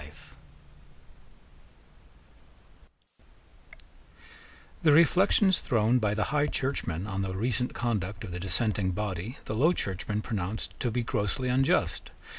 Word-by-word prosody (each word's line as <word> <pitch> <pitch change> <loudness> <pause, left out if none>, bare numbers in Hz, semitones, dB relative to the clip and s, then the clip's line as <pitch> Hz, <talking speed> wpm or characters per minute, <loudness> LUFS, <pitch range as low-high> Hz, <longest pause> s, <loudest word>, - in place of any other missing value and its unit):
The 155 - +5
reflections 185 +5 +4
thrown 115 0 +2
by 105 -2 0
the 105 - +1
High 150 0 +2
Churchmen 100 - -2
on 100 -2 -3
the 95 -1 -3
recent 120 +4 -1
conduct 105 -4 -2
of 100 - -7
the 90 - -5
dissenting 95 +1 0
body 105 +4 -4
the - - -4
Low 150 +11 +3
Churchmen 105 - -3
pronounced 105 -1 -4
to 125 - 0
be 120 +1 -1
grossly 115 +4 -1
unjust. 135 +2 +1
110 Hz, 110 wpm, -28 LUFS, 95-125 Hz, -, The